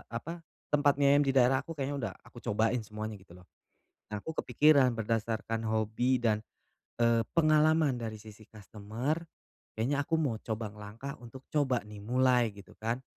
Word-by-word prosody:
apa, 165 +9 -6 0.3
tempat 145 -1 +4
mi 145 - +1
ayam 140 +1 +6
di 140 - +1
daerah 130 +1 +5
aku 160 +4 -8
kayaknya 140 +1 -2
udah - - -8
aku - - -13
cobain 115 +4 +1
semuanya 110 -1 -6
gitu 90 -2 -16
loh. 90 - -16 0.7
Nah, 105 - -3
aku 160 +10 -6
kepikiran 145 -4 +5
berdasarkan 115 0 -2
hobi 110 +4 +1
dan, 110 -3 +1 0.6
eee, 115 -1 +4 0.2
pengalaman 155 -1 +4
dari 115 -3 -5
sisi 110 0 -13
customer, 110 +6 -4 0.6
kayaknya 140 +6 +1
aku 160 +3 0
mau 130 -9 -1
coba 110 -2 -4
ngelangkah 105 +6 -8
untuk 125 +3 -11
coba 130 -7 +1
nih, 105 -1 -10
mulai, 125 +1 +3
gitu 100 -1 -14
kan. 115 +4 -3
115 Hz, 165 wpm, -31 LUFS, 110-140 Hz, 0.7 s, ayam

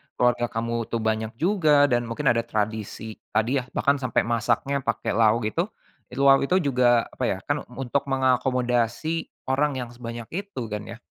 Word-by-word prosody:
keluarga 120 -1 +2
kamu 115 0 -2
tuh 115 -1 -2
banyak 110 0 -1
juga 155 - +3
dan 120 0 +2
mungkin 135 +5 0
ada 115 - +1
tradisi 110 0 -3 0.2
tadi 120 +5 +2
ya 125 - -8
bahkan 140 0 +2
sampai 125 -4 +1
masaknya 120 +4 0
pakai 115 -2 -1
lau 115 +1 +4
gitu, 170 - -1 0.4
itu 130 +2 -5
lau 135 0 +7 0.2
juga 125 -4 +3
apa 130 - -6
ya 95 - 0
kan 145 0 -2
untuk 135 +2 -2
mengakomodasi 125 +2 +1 0.2
orang 145 +1 +1
yang 125 -2 -4
sebanyak 120 -1 -7
itu 195 -6 -5
kan 105 0 -3
ya. 115 - -8
120 Hz, 165 wpm, -25 LUFS, 115-140 Hz, 0.4 s, lau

